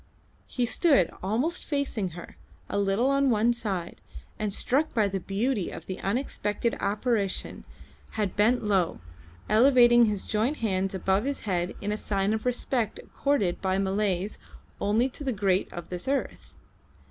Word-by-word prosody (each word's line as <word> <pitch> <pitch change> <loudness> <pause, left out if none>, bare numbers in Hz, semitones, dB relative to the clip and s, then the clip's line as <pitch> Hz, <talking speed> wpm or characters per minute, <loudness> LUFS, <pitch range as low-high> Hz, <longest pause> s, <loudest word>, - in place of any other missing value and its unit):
He 245 - -1
stood, 250 - +3
almost 240 - -1
facing 275 - -1
her, 175 - -10 0.3
a - - -1
little 200 +7 +2
on 275 0 +3
one 230 +1 +3
side, 195 -7 -4 0.4
and 210 -1 -1
struck 270 +9 0
by 215 -3 +3
the 195 0 -2
beauty 200 +3 -1
of - - -9
the 185 - -5
unexpected 230 0 -1
apparition 205 -1 -1 0.5
had 210 -4 -2
bent 225 +4 +3
low, 195 -5 +1 0.5
elevating 240 0 +6
his 205 -3 -1
joint 225 +8 0
hands 195 -3 -1
above 190 +4 +1
his 280 0 -2
head 180 -3 -2
in 205 - -2
a 210 - -1
sign 200 0 0
of 220 +2 -2
respect 245 -2 -1
accorded 245 -11 -1
by 190 -1 +1
Malays 195 0 -1 0.4
only 215 +5 +2
to 270 +2 -8
the 270 - 0
great 195 -4 0
of 175 -1 -8
this 180 +3 -6
earth. 275 0 -3
210 Hz, 155 wpm, -27 LUFS, 195-245 Hz, 0.5 s, elevating